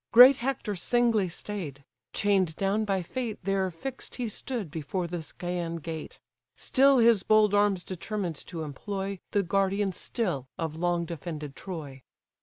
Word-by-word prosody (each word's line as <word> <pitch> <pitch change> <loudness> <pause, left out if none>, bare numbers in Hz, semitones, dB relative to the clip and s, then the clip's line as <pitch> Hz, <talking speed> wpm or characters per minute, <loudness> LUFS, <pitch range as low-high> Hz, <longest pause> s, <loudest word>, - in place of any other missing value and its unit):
Great 250 +3 +10
Hector 240 -5 -2
singly 225 0 +2
stay'd: 165 -7 -6 0.3
chain'd 190 -5 +2
down 200 +4 +1
by 195 -3 0
fate 230 +3 -3
There 195 0 +1
fix'd 255 +10 -7
he 245 -2 -2
stood 215 - -4
before 165 +4 -3
the 175 +1 -4
Scæan 170 0 -4
gate; 160 0 -6 0.4
Still 275 0 +4
his 230 -4 +5
bold 215 0 +4
arms 205 -3 +3
determined 185 -2 -4
to 165 -3 -5
employ, 195 +6 -4
The 205 - +2
guardian 195 +2 +1
still 175 - -2
of 160 -2 -3
long 175 +1 0
defended 155 -3 -6
Troy. 150 -8 -7
190 Hz, 145 wpm, -28 LUFS, 165-210 Hz, 0.4 s, Great